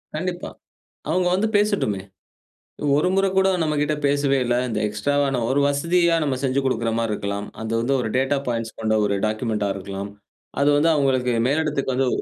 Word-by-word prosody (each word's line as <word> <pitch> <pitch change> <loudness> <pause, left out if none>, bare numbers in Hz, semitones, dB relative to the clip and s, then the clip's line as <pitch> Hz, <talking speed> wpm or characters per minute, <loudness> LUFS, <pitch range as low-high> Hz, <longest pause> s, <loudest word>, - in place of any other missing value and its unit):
கண்டிப்பா. 175 +2 -3 0.6
அவங்க 180 +3 +1
வந்து 205 +4 +1
பேசட்டுமே. 200 - 0 1.0
ஒரு 150 - +2
முறை 195 0 +3
கூட 190 0 +4 0.2
நம்மகிட்ட 150 -1 0
பேசவே 140 -1 +2
இல்ல. 120 0 +1
இந்த 110 -2 -2
எக்ஸ்ட்ராவா, 140 +8 0 0.2
ஒரு 135 +2 +2
வசதியா 170 +4 +2
நம்ம 140 -3 -1
செஞ்சு 135 0 +1
கொடுக்கிற 115 -3 0
மாரி 115 -1 -1
இருக்கலாம். 100 0 -4 0.2
அது 110 - -4
வந்து 135 +4 0
ஒரு 115 - -2
டேட்டா 135 +2 +1
பாயிண்ட்ஸ் 115 -2 -3
கொண்ட 110 0 +1
ஒரு 100 -1 0
டாக்குமெண்ட்டா 110 -1 -1
இருக்கலாம். 100 +1 -6 0.5
அது 140 - +4
வந்து 165 +3 +3
அவங்களுக்கு 130 -4 +1
மேலிடத்துக்கு 145 -2 0
வந்து 135 0 +1
135 Hz, 160 wpm, -22 LUFS, 110-150 Hz, 1.0 s, கூட